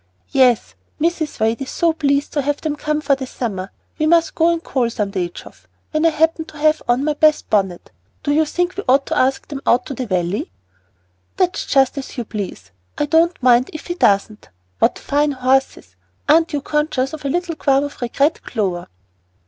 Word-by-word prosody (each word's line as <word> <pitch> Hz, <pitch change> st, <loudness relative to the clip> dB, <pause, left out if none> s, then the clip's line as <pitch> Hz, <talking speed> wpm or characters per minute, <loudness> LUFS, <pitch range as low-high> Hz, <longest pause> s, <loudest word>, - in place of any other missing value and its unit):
"Yes, 255 Hz, -4 st, +3 dB, 0.3 s
Mrs. 325 Hz, -1 st, -1 dB
Wade 225 Hz, +3 st, +1 dB
is 270 Hz, -, -4 dB
so 335 Hz, -1 st, +1 dB
pleased 280 Hz, -2 st, 0 dB
to 290 Hz, -, +1 dB
have 290 Hz, +1 st, -1 dB
them 310 Hz, -2 st, -2 dB
come 300 Hz, 0 st, -2 dB
for 285 Hz, -2 st, +2 dB
the 265 Hz, -1 st, -3 dB
summer. 200 Hz, -7 st, -4 dB, 0.3 s
We 310 Hz, -, +2 dB
must 335 Hz, 0 st, +3 dB
go 330 Hz, +1 st, +3 dB
and 335 Hz, 0 st, -2 dB
call 250 Hz, -4 st, 0 dB
some 210 Hz, -3 st, -3 dB
day, 180 Hz, -3 st, -2 dB
Geoff, 90 Hz, -, -13 dB, 0.2 s
when 310 Hz, +2 st, +2 dB
I -, -, +5 dB
happen 320 Hz, +1 st, +1 dB
to 310 Hz, -, -13 dB
have 310 Hz, +1 st, +2 dB
on 245 Hz, +3 st, +2 dB
my 300 Hz, 0 st, +1 dB
best 305 Hz, +1 st, +2 dB
bonnet. 190 Hz, -4 st, 0 dB, 0.3 s
Do 290 Hz, -, 0 dB
you 310 Hz, +2 st, +3 dB
think 355 Hz, +4 st, -1 dB
we 400 Hz, -, -3 dB
ought 270 Hz, +2 st, +4 dB
to -, -, -2 dB
ask 265 Hz, +1 st, +1 dB
them 280 Hz, -2 st, -6 dB
out 240 Hz, -, +3 dB
to 275 Hz, -, -5 dB
the 255 Hz, -2 st, -4 dB
Valley?" 180 Hz, 0 st, -1 dB, 0.9 s
"That's 365 Hz, -1 st, 0 dB
just 270 Hz, 0 st, +2 dB
as 270 Hz, -, -9 dB
you 240 Hz, -, -3 dB
please. 185 Hz, -, -6 dB, 0.3 s
I -, -, +1 dB
don't 325 Hz, 0 st, +2 dB
mind 245 Hz, 0 st, +4 dB
if 310 Hz, -, -8 dB
he 350 Hz, -, -3 dB
doesn't. 210 Hz, -, +1 dB, 0.3 s
What -, -, +2 dB
fine 290 Hz, 0 st, 0 dB
horses. 265 Hz, +1 st, 0 dB, 0.3 s
Aren't 325 Hz, +2 st, +4 dB
you 290 Hz, -, -1 dB
conscious 300 Hz, -3 st, -1 dB
of 310 Hz, -, -7 dB
a 280 Hz, -, -1 dB
little 350 Hz, +3 st, -1 dB
qualm 275 Hz, -2 st, +2 dB
of 285 Hz, -2 st, -7 dB
regret, 280 Hz, +6 st, +1 dB
Clover?" 190 Hz, -6 st, -3 dB
280 Hz, 205 wpm, -19 LUFS, 240-310 Hz, 0.9 s, I